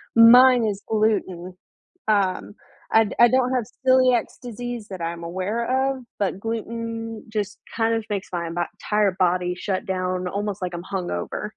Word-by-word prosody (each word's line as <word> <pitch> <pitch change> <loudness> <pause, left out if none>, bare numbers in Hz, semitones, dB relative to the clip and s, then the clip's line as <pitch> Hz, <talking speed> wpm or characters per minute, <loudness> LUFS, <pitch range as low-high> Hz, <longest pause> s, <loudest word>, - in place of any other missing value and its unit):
Mine 245 +1 +8
is 205 -1 -2
gluten. 195 -5 0 0.5
Um, 200 -1 0 0.4
I 225 - +6
d - - -6
I 240 - +9
don't 255 0 +2
have 245 -4 0 0.2
celiacs 255 -2 +4
disease 245 -2 -6
that 190 -3 -7
I'm 170 0 -4
aware 230 +10 -1
of, 260 -2 -7 0.2
but 195 -2 -1
gluten 225 0 -5
just 210 -2 -3 0.2
kind 225 0 +1
of 225 -1 -3
makes 200 -1 -3
my 170 -2 -3
bo 175 +1 -1 0.3
'tire 210 -3 +2
body 180 0 +1
shut 190 -1 -3
down 185 -1 -2
almost 205 +1 -3
like 180 -1 -3
I'm 175 - -6
hungover. 180 - -4
210 Hz, 160 wpm, -23 LUFS, 185-230 Hz, 0.5 s, I